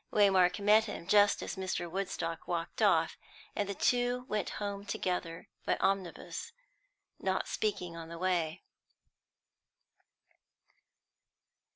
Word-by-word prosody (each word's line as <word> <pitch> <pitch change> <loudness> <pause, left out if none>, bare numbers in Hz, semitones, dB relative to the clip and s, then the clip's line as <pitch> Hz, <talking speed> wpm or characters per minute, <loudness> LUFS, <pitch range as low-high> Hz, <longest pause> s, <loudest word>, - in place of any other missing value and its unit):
Waymark 190 -3 +5
met 210 +2 +5
him 205 -5 -6
just 205 +2 +4
as - - -4
Mr. 185 -2 -2
Woodstock 170 -2 -3
walked 170 -1 -3
off; - - +3 0.4
and 205 -1 -1
the 200 - -2
two 245 +3 +1
went 210 -4 -1
home 200 -1 -3
together 180 -4 -3 0.2
by - - +1
omnibus, 195 - -2 0.7
not 190 0 0
speaking 190 -5 -2
on 165 -1 -8
the 170 - -7
way. 175 -2 0
190 Hz, 110 wpm, -32 LUFS, 175-205 Hz, 0.7 s, Waymark